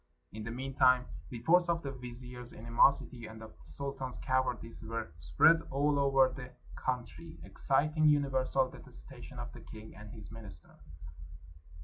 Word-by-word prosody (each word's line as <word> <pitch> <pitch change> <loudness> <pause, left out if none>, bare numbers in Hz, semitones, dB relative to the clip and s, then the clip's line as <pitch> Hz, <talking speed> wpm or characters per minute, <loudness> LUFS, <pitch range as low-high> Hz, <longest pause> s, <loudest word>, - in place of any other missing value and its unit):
In 110 +1 -6
the 115 - -5
mean 130 +3 -5
time 130 -1 +5 0.2
reports 170 +9 +3
of 170 0 +1
the 140 - -3
vizier's 125 -1 -6
animosity 115 +1 +2
and 110 0 -10
of 110 - -10
the - - -19
sultan's 135 -2 -3
cowardice 130 -3 -1
were 115 -3 -4
spread 80 - +5
all 145 +1 +2
over 135 -1 +5
the 130 -2 -8 0.2
coun 125 -2 -1
try, 85 0 -12
exciting 150 - +2
universal 135 -2 +3
detestation - - -11
of - - -6
the - - -11
king 110 0 -11
and 105 0 -10
his 110 -2 -7
minister. 105 -8 -6
125 Hz, 150 wpm, -32 LUFS, 110-135 Hz, 0.2 s, time